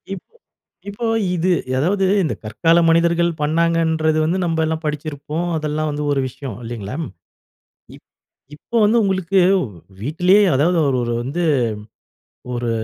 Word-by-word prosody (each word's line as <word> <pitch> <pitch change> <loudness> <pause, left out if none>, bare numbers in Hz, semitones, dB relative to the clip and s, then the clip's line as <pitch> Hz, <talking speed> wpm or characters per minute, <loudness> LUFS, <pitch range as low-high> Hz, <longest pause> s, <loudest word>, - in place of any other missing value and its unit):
.இப்போ 195 - -15 0.5
இப்போ 205 +4 -5 0.3
இது 180 +2 +1 0.2
அதாவது 190 +8 +1 0.2
இந்த 160 - -1
கற்கால 165 +11 +2
மனிதர்கள் 170 +1 +3
பண்ணாங்கன்றது 160 0 +1
வந்து 170 +4 0
நம்ப 165 -1 -1
எல்லாம் 160 +1 -3
படிச்சிருப்போம். 150 +2 -4
அதெல்லாம் 155 0 -2
வந்து 150 0 -3
ஒரு 140 - +1
விஷயம் 130 -2 -8
இல்லைங்களா? 115 -1 -6 1.0
இப் - - -19 0.5
இப்போ 235 +10 -4
வந்து 220 +3 +3
உங்களுக்கு 190 -1 +1 0.2
வ் - - -2 0.4
வீட்டிலேயே 180 - +3
அதாவது 170 +6 +2
அவரு 135 -3 +1
ஒரு 120 0 -2
வந்து, 150 +8 -3 1.1
ஒரு 120 -1 -2
160 Hz, 130 wpm, -20 LUFS, 145-175 Hz, 1.1 s, மனிதர்கள்